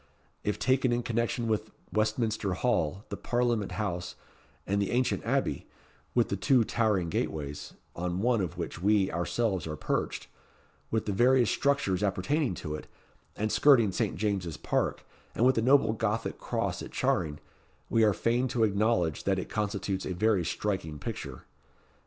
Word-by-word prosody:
If 105 - -1
taken 130 -1 +2
in 120 0 0
connection 115 +1 -1
with 110 -1 -1 0.2
Westminster 110 -2 0
Hall, 95 -4 0
the - - -3
Parliament 120 -4 0
House, 90 -5 -3 0.5
and 100 +1 0
the 100 - 0
ancient 125 +1 +1
Abbey - - -1 0.5
with 120 -2 +3
the - - 0
two 115 +6 +3
towering 105 -6 +1
gateways, 75 -3 -3 0.2
on 90 +1 -2
one 120 0 +2
of 90 -5 -4
which 80 - -5
we, 100 0 +3
ourselves, 95 +2 -1
are 75 - -4
perched - - -2 0.6
with 110 -1 0
the 105 - -1
various 120 +3 +4
structures 140 -10 +1
appertaining 105 - 0
to 75 -2 -5
it, 75 - -6 0.5
and 110 +1 -1
skirting 120 -8 +5
Saint - - -1
James's 95 -5 -2
Park, - - -1 0.3
and 120 - +3
with 130 - +6
the 115 - +1
noble 130 -2 +4
gothic 110 0 -2
cross - - -2
at - - -8
Charing, 75 -4 0 0.5
we 115 - +3
are 105 - +5
fain 120 +5 +1
to 120 -2 0
acknowledge, 100 -6 +1
that 95 -1 +2
it 95 - -4
constitutes 100 -2 -2
a 90 - -3
very 105 -1 +2
striking 85 -3 -2
picture. - - -6
105 Hz, 160 wpm, -29 LUFS, 95-115 Hz, 0.6 s, with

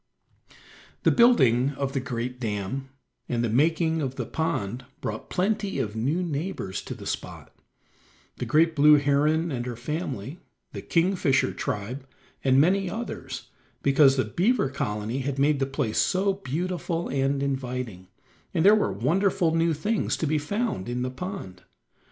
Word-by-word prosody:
The - - +5
building 140 - +4
of 135 -1 -2
the 135 - 0
great 125 -1 -4
dam, 110 +4 -3 0.4
and 120 -1 0
the 115 - 0
making 160 +5 +2
of 135 -2 -3
the - - -3
pond 130 -8 -2 0.2
brought - - -5
plenty 200 +1 0
of 105 0 -2
new 140 +11 0
neighbors 155 - -3
to - - -5
the - - -10
spot: - - -6 0.8
the - - -4
great 160 +1 +3
blue 150 +1 +7
heron 150 +3 +2
and 120 -3 -2
her 120 - -4
family, 135 - -4 0.3
the - - -5
kingfisher 170 -5 +2
tribe, 125 +7 -4 0.4
and 135 0 +4
many 190 +5 +3
others, 230 +6 -6 0.3
because 140 -1 +5
the 130 - +2
Beaver 205 - +1
Colony 105 -1 -3
had 135 0 -2
made 140 +1 +3
the 135 - +1
place 125 -5 -1
so 195 +1 +2
beautiful 175 0 -3
and 135 +1 0
inviting, 125 -8 -3 0.5
and 165 - +2
there 205 - +9
were 215 - +2
wonderful 165 - +1
new 165 0 +2
things 210 +7 -1
to - - -1
be 155 0 +1
found 200 - -2
in 125 +1 -2
the 125 - -2
pond. 130 - -7
140 Hz, 155 wpm, -26 LUFS, 125-170 Hz, 0.8 s, there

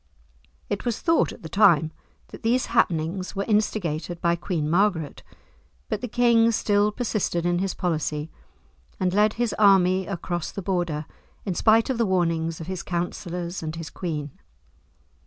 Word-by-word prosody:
It 205 - -3
was 240 -3 -2
thought 330 -1 +2
at - - -13
the - - -5
time 165 -4 +4 0.4
that - - -11
these 240 +3 +1
happenings 170 +4 0
were 195 - -1
instigated 180 -6 -1
by 170 0 +2
Queen 170 -3 -2
Margaret, 170 -3 +1 0.7
but - - -2
the 250 - -3
king 230 -1 +4
still 205 -1 +2
persisted 210 -7 -1
in 175 0 +1
his 190 0 -2
policy, 155 -3 -2 0.7
and 185 -1 0
led 210 +2 +3
his 240 -2 -1
army 190 -2 +4
across 175 -3 -3
the 195 - -7
Border, 175 -5 -1 0.4
in 190 - -1
spite 220 +7 +3
of 245 - -3
the 230 - +2
warnings 165 -3 0
of 165 - -6
his 185 0 -4
counsellors 175 0 -4
and 160 0 -4
his 165 -1 -7
queen. 150 -5 -4
180 Hz, 155 wpm, -25 LUFS, 165-210 Hz, 0.7 s, time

